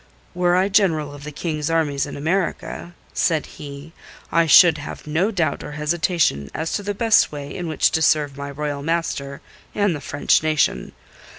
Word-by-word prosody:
"Were 175 0 +2
I 185 +2 +3
General 165 -8 +1
of 145 -1 -11
the 150 - -6
King's 155 0 -3
Armies 150 -4 0
in 145 - -7
America," 170 +1 -2 0.2
said 160 -3 +1
he, 145 +2 -10 0.4
"I 165 0 +3
should 160 0 +7
have 145 - -8
no 160 +7 +1
doubt 180 -7 -1
or 150 - -8
hesitation 150 - 0
as 160 +1 -3
to - - -1
the 205 0 -4
best 225 +1 +3
way 145 -1 -7
in 175 -2 -4
which 155 - +2
to 160 - 0
serve 150 -3 +2
my 140 0 -6
Royal 145 0 -4
master 140 -3 -2 0.3
and 205 -5 +1
the 145 - -7
French 145 - +1
nation. 155 -1 0
155 Hz, 180 wpm, -21 LUFS, 145-175 Hz, 0.4 s, should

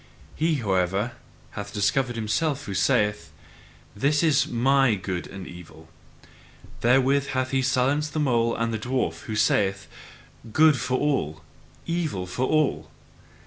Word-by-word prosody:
He, 160 +1 +1
however, 100 -1 0 0.4
hath 105 0 -7
discovered 120 +5 0
himself 140 +7 -1
who 100 - -5
saith: 105 +2 +1 0.6
This 145 +8 +1
is 145 -4 +3
MY 135 0 +3
good 90 -2 -4
and 95 -1 -9
evil: 80 -2 -12 0.9
therewith 135 +3 +3
hath 130 0 -1
he 135 -1 +1
silenced 135 +4 +1
the 155 - -1
mole 120 -5 +1
and 115 0 -1
the 110 - -2
dwarf, 125 +4 -2
who 110 - -4
say: 100 -2 +2 0.8
"Good 155 +2 +5
for 130 +3 -1
all, 80 - -1 0.4
evil 160 - -2
for 125 +9 -2
all." 155 -2 +1
125 Hz, 135 wpm, -25 LUFS, 100-140 Hz, 0.9 s, Good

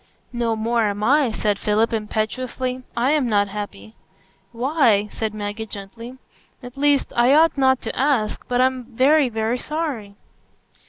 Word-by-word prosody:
"No 235 -2 0
more 225 +1 0
am 205 +1 -4
I," 280 +2 +3
said 210 -2 -1
Philip, 215 +3 +1
impetuously; 250 +4 -3 0.2
"I 250 +4 +2
am 290 -5 +1
not 205 -2 +2
happy." 205 +1 -7 0.6
"Why?" 240 -4 +2
said 220 -1 -3
Maggie, 210 +1 -5
gently. 230 +5 -9 0.5
"At 245 +1 -10
least—I 275 -2 +3
ought 325 +2 +4
not 265 -2 +2
to - - -5
ask—but 250 -2 0
I'm 255 -1 +1
very, 270 +4 +3
very 225 +2 -1
sorry." 280 -11 -4
235 Hz, 140 wpm, -21 LUFS, 215-260 Hz, 0.6 s, ought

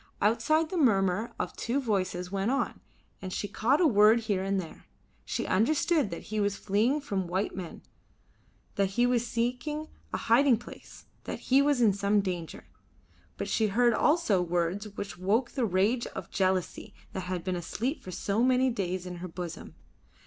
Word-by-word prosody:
Outside 310 +10 +2
the 370 - -2
murmur 205 - +2
of - - -3
two 245 +5 -1
voices 185 -7 -2
went 195 +2 0
on, 275 +2 -1 0.4
and 185 -1 -6
she 205 - -3
caught 250 +8 +1
a 360 - +4
word 220 -3 +5
here 205 -4 -1
and 195 0 0
there. 165 -4 -9 0.4
She - - -2
understood 295 - +2
that 170 - -6
he 215 - 0
was 200 -1 +1
fleeing 215 +9 +1
from 195 -10 -2
white 185 +4 -2
men, 180 -3 -7 0.9
that 200 -1 +3
he 240 - +5
was 245 -1 +1
seeking 250 +7 -2 0.2
a - - -1
hiding 245 +1 +4
place, 240 - -13 0.2
that - - -4
he 270 +2 +7
was 285 -3 +2
in 215 -4 +5
some 200 +1 +2
danger. 180 -4 -4 0.7
But - - -3
she 220 - +1
heard 235 +4 +3
also 295 - +2
words 175 +4 -1
which 200 -2 -7
woke 215 +7 +1
the 255 -4 0
rage 210 +5 +1
of - - -8
jealousy 185 -2 -1 0.2
that 190 -1 -4
had 180 -2 -3
been 185 -1 -2
asleep 235 - -3
for - - -9
so 200 +4 -1
many 255 +1 +3
days 185 -5 -3
in 180 -1 -6
her 180 +1 -6
bosom. 175 -1 -7
210 Hz, 180 wpm, -29 LUFS, 185-245 Hz, 0.9 s, he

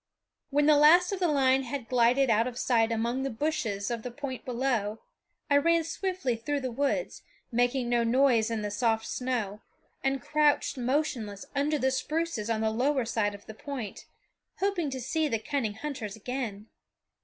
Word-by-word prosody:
When 290 +1 +2
the 300 -1 +6
last 345 +5 +6
of 395 - -2
the 360 - +2
line 270 -3 +3
had 260 -1 -5
glided 250 +1 +3
out 225 +2 +3
of 250 -1 -6
sight 230 -2 +2
among 235 +3 -1
the 270 - -1
bushes 230 -6 -2
of 235 -1 -2
the 250 - -5
point 260 +1 -6
below, 240 -4 -1 0.5
I 285 - +4
ran 335 +3 +3
swiftly 360 -6 -2
through 285 +5 -2
the 255 -1 -3
woods, 285 - -1 0.3
making 245 +1 +1
no 240 -1 +2
noise 235 -2 +3
in 225 -2 -2
the 205 - -3
soft 225 0 +1
snow, 225 -5 -3 0.4
and 270 0 +1
crouched 300 +3 +2
motionless 245 -6 -2
under 295 +2 +1
the 265 -1 +1
spruces 300 -4 -2
on 220 -1 0
the 220 0 +1
lower 260 +3 +1
side 210 -3 0
of 205 - -14
the 220 - -9
point, 245 -3 -7 0.5
hoping 380 -6 0
to 260 -1 -4
see 310 +6 0
the 230 -5 0
cunning 220 -2 -2
hunters 230 -6 -5
again. 220 -2 -5
255 Hz, 180 wpm, -28 LUFS, 225-285 Hz, 0.5 s, the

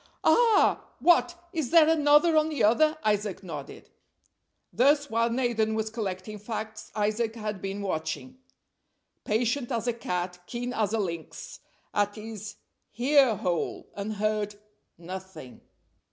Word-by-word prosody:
"Ah! 460 -4 +4
What, 350 0 +4 0.2
is 315 -6 -2
there 330 -2 +6
another 315 +1 +4
on 310 0 +3
the 305 - -1
other?" 305 +9 +4
Isaac 210 -2 0
nodded. 150 -6 -8 0.8
Thus, 285 +3 +3
while 230 +1 +2
Nathan 230 -3 0
was 220 0 -2
collecting 210 -1 -5
facts, 220 0 -6
Isaac 215 +2 0
had 210 -4 -5
been 195 +1 -4
watching, 200 +9 -4 0.9
"patient 240 +4 0
as 230 -2 -1
a 240 - +1
cat, 180 -5 -3
keen 245 +1 -4
as 215 -2 0
a 225 - +1
lynx," 170 -5 -5 0.3
at 205 0 +1
his 215 -1 -8 0.4
ear 265 -2 +4
hole, 175 -3 -3
and 205 +2 -4
heard 210 0 -1 0.4
nothing. 185 -6 -9
220 Hz, 130 wpm, -27 LUFS, 205-255 Hz, 0.9 s, there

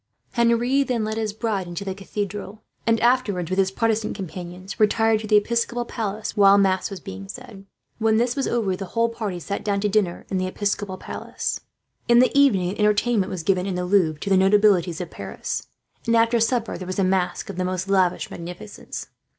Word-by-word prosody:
Henri 235 +3 +2
then 250 -5 0
led 220 +1 -2
his 220 -2 -1
bride 210 -4 -2
into 175 +3 -5
the 190 - -2
cathedral; 200 +1 -5 0.2
and 230 0 +3
afterwards, 215 -8 +1
with 185 - +1
his 190 -1 +3
Protestant 225 +2 0
companions, 185 0 -7
retired 220 +1 +3
to 215 - -6
the 210 0 +5
Episcopal 235 +3 0
Palace 215 -2 -4
while 200 -1 +6
mass 190 -2 +2
was 195 -2 -7
being 95 - -8
said. 195 - -10 0.3
When 220 -1 +3
this 240 +1 +1
was 275 - -1
over, 215 -6 0
the 195 +1 -6
whole 230 0 +3
party 215 -6 -4
sat 200 +5 -4
down 200 -1 0
to 210 - +1
dinner 195 -4 0
in 190 - 0
the 185 - -1
Episcopal 200 0 -2
Palace. - - -4 0.5
In 235 -1 +6
the 255 +3 +4
evening 205 -11 +4
an 205 - -8
entertainment 210 -1 +2
was 180 -3 -4
given, 185 +1 +1
in 190 - -2
the 180 0 -2
Louvre, 180 -5 +2
to 200 - -3
the 190 - +6
notabilities 190 -3 +4
of 175 - -6
Paris; 100 -1 -5 0.4
and 230 - +3
after 230 +1 +4
supper 230 0 0
there 185 - -7
was 185 - -4
a 195 - +2
masque 185 -1 0
of - - -11
the 185 - 0
most 185 +1 -2
lavish 190 -2 +1
magnificence. 180 +5 -7
200 Hz, 205 wpm, -23 LUFS, 185-225 Hz, 0.5 s, while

